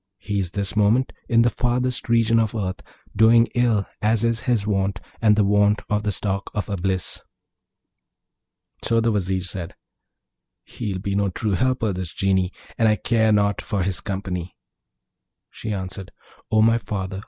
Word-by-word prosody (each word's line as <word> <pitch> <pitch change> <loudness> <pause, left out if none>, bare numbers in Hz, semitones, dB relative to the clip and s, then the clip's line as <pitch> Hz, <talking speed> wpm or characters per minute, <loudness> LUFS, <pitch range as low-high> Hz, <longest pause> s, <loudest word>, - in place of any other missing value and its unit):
He's 100 -4 -2
this 100 +2 -3
moment 110 +5 +2 0.2
in 115 -1 +5
the 120 - +2
farthest 125 +1 -1
region 115 -1 +4
of 110 0 0
earth, 95 -3 -3 0.3
doing 115 +2 +6
ill, 120 -5 +2 0.2
as 110 +1 +2
is 115 -1 +1
his 110 -5 +2
wont, 95 -2 0 0.2
and 105 -2 +5
the 105 - +3
wont 105 +1 +3
of 105 0 +2
the 105 0 -1
stock 100 0 -2
of 105 - -1
Eblis.' 95 -2 -2 1.6
So 115 0 +2
the 115 0 +2
Vizier 95 -2 0
said, 90 -1 -5 0.9
'He'll 105 -6 -5
be 100 +1 -3
no 100 0 +1
true 105 +4 -2
helper, 115 +1 +1
this 90 -2 -5
Genie, 95 -1 +1 0.3
and 115 -1 +4
I 105 - +4
care 110 +2 +2
not 100 -1 +2
for 100 -4 -2
his 95 0 -1
company.' 95 -2 -4 1.0
She 110 - -6
answered, 95 -1 -5 0.4
'O 110 0 +4
my 115 +1 +4
father! 95 -3 -4
105 Hz, 160 wpm, -23 LUFS, 95-115 Hz, 1.6 s, doing